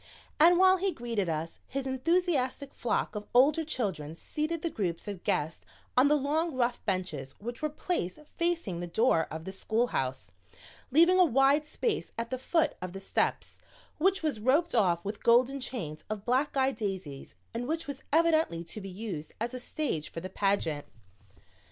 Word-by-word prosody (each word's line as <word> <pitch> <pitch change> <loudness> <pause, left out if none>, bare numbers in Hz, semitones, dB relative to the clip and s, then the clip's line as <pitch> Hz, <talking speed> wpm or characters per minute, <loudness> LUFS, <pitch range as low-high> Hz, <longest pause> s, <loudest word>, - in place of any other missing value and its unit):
And 345 +3 +7
while 375 +1 +6
he 385 +1 +1
greeted 230 - -2
us, 160 +1 -3
his 275 0 -3
enthusiastic 280 -1 0
flock 235 - -1
of 210 -1 -6
older 295 +6 +5
children 190 - -3
seated 310 - -3
the 335 - +1
groups 180 - -3
of 200 -4 -6
guests 155 +2 -1 0.3
on 255 +3 +6
the 300 - +4
long 300 +2 0
rough 245 -1 0
benches 165 -9 -3
which 235 +3 -7
were 305 - 0
placed 295 - -2 0.2
facing 335 - 0
the 175 - -4
door 175 -2 +2
of 160 +1 -6
the 190 - -4
schoolhouse, 190 - -1 0.6
leaving 340 +7 +5
a - - +9
wide 280 0 +4
space 445 +7 -2
at 230 +1 -3
the 255 - -2
foot 315 +3 +1
of 180 -1 -5
the 195 - -6
steps, 195 - -1 0.4
which 380 +2 +2
was 300 -8 0
roped 290 +10 +2
off 180 -6 +2
with 205 +1 -4
golden 250 +4 +4
chains 190 - -5
of 215 -2 -4
black 260 +4 +1
eyed 265 -2 +2
daisies 190 - -5 0.2
and 240 +2 -3
which 325 +2 -1
was 285 -2 -6
evidently 315 - +3
to 170 +6 -8
be 195 - -7
used 185 -6 -6
as 235 +3 -2
a 255 - -4
stage 245 - -2
for - - -6
the 185 +2 -7
pageant. 190 -8 0
245 Hz, 175 wpm, -30 LUFS, 185-305 Hz, 0.6 s, a